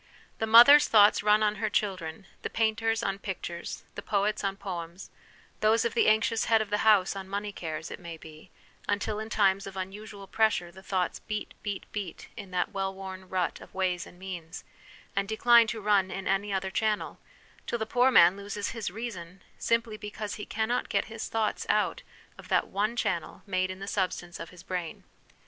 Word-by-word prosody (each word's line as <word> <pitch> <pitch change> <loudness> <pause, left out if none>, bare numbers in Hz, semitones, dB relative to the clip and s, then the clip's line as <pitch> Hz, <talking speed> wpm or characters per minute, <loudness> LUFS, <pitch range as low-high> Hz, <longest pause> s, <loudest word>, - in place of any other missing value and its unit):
The 220 - 0
mother's 240 +7 +9
thoughts 210 -1 +6
run 210 +1 +4
on 210 0 +1
her 215 +1 -1
chil 205 -2 +1
dren, 165 +1 -8 0.2
the - - -3
painter's 225 0 0
on 195 0 -1
pictures, 175 -3 -6
the - - -6
poet's 205 +1 0
on 195 0 -1
poems; 175 -1 -7 0.5
those 220 +2 +3
of 235 - 0
the - - +3
anxious 220 +1 +3
head 225 -1 +4
of 215 -1 -3
the 210 - +1
house 205 -3 +4
on 190 -1 -7
money 205 +1 -3
cares, 160 -3 -6
it - - -7
may 170 -2 -8
be, 155 0 -13 0.4
until 210 +1 -1
in 220 0 -5
times 195 -2 +2
of 195 -1 -8
unusual 200 +2 -7
pressure 210 -5 +1
the 190 +2 -13
thoughts 185 -2 -1
beat, 210 0 -5
beat, 205 -2 -4
beat 200 -5 -6
in 205 -4 -8
that 180 -1 -1
well 195 0 -1
worn 190 -1 -9
rut 180 -4 -1
of - - -14
ways 185 -2 -1
and 175 - -15
means, 180 -2 -7 0.5
and 195 0 0
decline 235 +2 +5
to 220 0 -3
run 200 -2 +2
in 195 0 -5
any 195 +2 0
other 190 0 -1
channel, 215 +1 -1 0.5
till 235 - -1
the 220 - -2
poor 245 +3 +3
man 175 -7 +7
loses 200 0 -4
his 230 -2 -4
reason, 185 -4 -7 0.2
simply 230 -2 0
because 210 0 -6
he 210 - -7
cannot 225 +3 -1
get - - +1
his 225 - -5
thoughts 220 -1 -1
out - - +1 0.4
of - - -11
that - - +2
one 210 +4 -1
channel 170 -7 -2
made 185 -2 0
in 185 - -6
the 195 - -7
substance 185 -3 -2
of 165 - -7
his 180 0 -14
brain. 180 -3 -5
200 Hz, 200 wpm, -28 LUFS, 185-220 Hz, 0.5 s, mother's